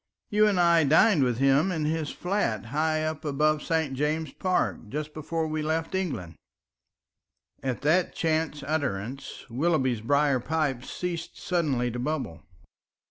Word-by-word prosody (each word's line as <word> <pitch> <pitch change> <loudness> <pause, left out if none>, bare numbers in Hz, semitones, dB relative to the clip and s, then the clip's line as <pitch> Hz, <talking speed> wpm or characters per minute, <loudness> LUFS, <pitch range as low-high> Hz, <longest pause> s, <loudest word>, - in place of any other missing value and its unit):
"You 215 +1 +5
and 200 -3 +2
I 170 -2 +5
dined 160 +4 +5
with 125 -3 +1
him 135 +7 +3
in 160 -4 -1
his 155 -1 -1
flat 180 - -1
high 155 +1 +1
up 155 -1 -3
above 150 +1 +1
St. 160 -4 0
James's 150 +2 -1
Park 185 - -1
just 150 +3 -4
before 160 +1 -2
we 155 0 -2
left 160 +3 -1
England." 135 - -2 1.3
And 130 -2 -1
at - - -18
that 170 +5 +2
chance 155 -2 0
utterance 135 -3 -3
Willoughby's 130 -3 +1
briar 140 +2 +2
pipe 140 -2 -1
ceased 175 -2 -5
suddenly 140 -9 0
to 120 - -5
bubble. 130 - -3
155 Hz, 145 wpm, -27 LUFS, 135-165 Hz, 1.3 s, You